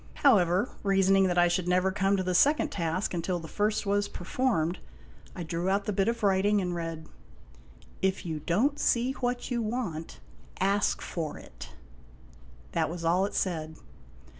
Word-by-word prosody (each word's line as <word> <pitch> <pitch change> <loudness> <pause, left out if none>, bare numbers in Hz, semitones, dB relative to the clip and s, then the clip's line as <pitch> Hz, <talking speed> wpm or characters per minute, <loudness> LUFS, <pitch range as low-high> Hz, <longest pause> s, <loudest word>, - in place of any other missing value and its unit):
However, 185 -7 +4
reasoning 195 -1 +3
that 180 -1 -1
I 175 0 +5
should 175 0 -1
never 180 +1 +2
come 195 0 +1
to 185 - -1
the 180 0 -1
second 295 - +3
task 170 +2 -2
until 175 +1 -1
the 165 -1 -8
first 210 +5 0
was 205 0 +1
performed, 180 -4 -1 0.6
I 175 - -5
drew 170 +3 -2
out 200 +1 +1
the 210 - -1
bit 195 +1 +1
of 230 -1 -1
writing 200 +1 +3
and 180 -2 -2
read: 165 -2 -5 0.5
" 60 0 -24
IF 190 -1 0
YOU 160 -3 -3
DON'T 230 - +1
SEE 245 +2 +2
WHAT 245 -1 -3
YOU 240 -1 0
WANT, 215 -9 -4 0.4
ASK 200 +2 +1
FOR 160 -4 -4
IT." - - -12 1.0
That 155 - 0
was 170 0 -5
all 180 +4 +3
it 205 - -9
said. 160 -4 -2
190 Hz, 170 wpm, -28 LUFS, 170-205 Hz, 1.0 s, I